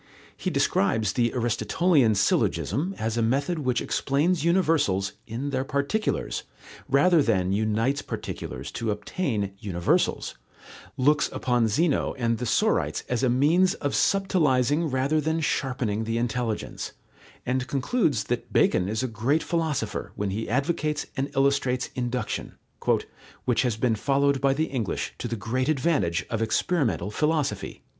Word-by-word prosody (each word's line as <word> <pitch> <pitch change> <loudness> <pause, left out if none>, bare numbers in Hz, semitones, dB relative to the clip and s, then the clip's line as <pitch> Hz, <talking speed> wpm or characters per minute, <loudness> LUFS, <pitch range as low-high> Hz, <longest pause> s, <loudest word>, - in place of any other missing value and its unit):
He - - -3
describes 105 0 +1
the 120 -2 +1
Aristotelian 120 - +2
syllogism 170 - +1
as 110 +1 -2
a - - +2
method 140 +9 0
which 130 -4 0
explains 150 +4 +1
universals 160 - +2
In 125 +5 -4
their 130 -1 0
particulars, 140 +11 -1 0.5
rather 155 +5 +5
than 95 -8 +1
unites 110 +7 +1
particulars 65 +3 -6
to 115 -2 -3
obtain 105 - -2
universals, 90 -6 0 0.6
looks 145 +4 +3
upon 120 -2 +1
Zeno 150 +8 +1
and 115 -3 0
the 125 - -2
sorites 215 - +1
as 125 -2 0
a 130 - +2
means 155 +9 +3
of 140 -1 -3
subtilizing 155 - +2
rather 135 +4 +1
than 160 +2 0
sharpening 125 -8 -1
the 115 +1 -1
intelligence, 115 -1 -3 0.5
and 130 0 -1
concludes 140 - +1
that 120 +2 -3
Bacon 90 +1 +3
is 110 +4 -1
a - - 0
great 120 +7 0
philosopher, 140 - -2
when 100 -1 -2
he 110 +3 -3
advocates 150 +3 0
and 135 +1 -1
illustrates 135 -2 +1
induction, 125 0 -3 0.9
"which 125 -3 +2
has 120 -4 0
been 115 0 +2
followed 140 +4 +1
by 135 0 +3
the 155 +3 +1
English 120 - -3
to - - -3
the 115 - -3
great 125 +6 -1
advantage 130 - +1
of 115 -1 -1
experimental 115 - 0
philosophy." 150 +3 -1
130 Hz, 140 wpm, -26 LUFS, 110-150 Hz, 0.9 s, rather